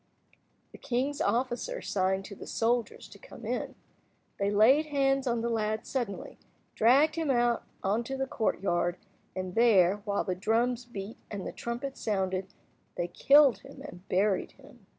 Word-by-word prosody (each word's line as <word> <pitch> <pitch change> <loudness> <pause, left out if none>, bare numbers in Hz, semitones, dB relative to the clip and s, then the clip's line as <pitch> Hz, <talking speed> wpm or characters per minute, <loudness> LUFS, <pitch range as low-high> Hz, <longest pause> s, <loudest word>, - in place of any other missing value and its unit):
The - - -13
king's 270 +3 -1
officer 255 - -1
signed 190 0 -1
to 205 - -9
the - - -10
soldiers 235 0 -1
to - - -14
come - - -12
in. - - -3 0.6
They 200 0 +1
laid 245 +10 +5
hands 275 -2 +1
on 235 -1 0
the 235 - -1
lad 215 -1 -1
suddenly, 240 -7 -4 0.3
dragged 270 +7 +4
him 320 -3 -1
out 240 -2 +2 0.2
into 230 +7 -1
the 270 - -1
courtyard, 180 -7 -1 0.4
and 185 -1 -4
there, 200 -5 +5
while 205 -1 -2
the 185 - -1
drums 230 +6 0
beat 210 -2 -7
and 200 -3 -5
the - - -4
trumpets 250 +3 -5
sounded, 190 -3 -1 0.5
they 175 0 -2
killed 275 +1 +5
him - - -13
and 180 +2 -11
buried 190 +1 +1
him. - - -19
225 Hz, 155 wpm, -29 LUFS, 195-255 Hz, 0.6 s, laid